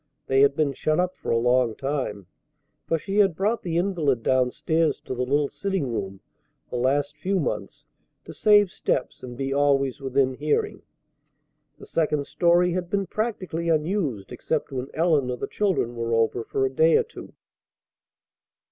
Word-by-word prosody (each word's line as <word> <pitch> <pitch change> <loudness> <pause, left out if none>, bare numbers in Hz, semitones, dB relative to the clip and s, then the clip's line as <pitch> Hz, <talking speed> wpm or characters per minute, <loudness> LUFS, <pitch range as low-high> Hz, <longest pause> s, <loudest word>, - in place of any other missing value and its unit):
They 135 0 +3
had 140 0 +4
been 145 -2 +1
shut 155 +4 0
up 180 0 +1
a - - -4
long 120 0 +2
time, 135 -8 -3 0.6
for 165 - +1
she 195 +5 -4
had 195 -5 +4
brought 210 +6 0
the 170 -2 -2
invalid 165 - 0
down 130 0 +2
stairs 160 +3 0
to - - -5
the 125 - -3
little 140 +3 +1
sitting 190 -8 -3
room 95 -3 -4 0.5
the 125 - -2
last 140 +4 0
few 190 +6 -1
months 150 - -4 0.4
to - - -9
save 205 -3 +4
steps 130 - -2
and 125 -1 -8
be 135 0 -2
always 140 -2 +1
within 135 0 +1
hearing. 145 +3 -1 1.0
The - - -12
second 150 -3 0
story 175 +2 +3
had 175 0 -3
been 200 0 0
practically 185 -5 -3
unused 155 - -1
except 155 -2 -3
when 130 -1 -4
Ellen 155 -6 +2
or 125 - -2
the - - -3
children 185 - -1
were 115 0 -1
over 115 +1 +1
for 135 - -1
a 130 - -1
day 160 +4 +5
or - - +2
two. 465 - -12
145 Hz, 170 wpm, -25 LUFS, 130-175 Hz, 1.0 s, day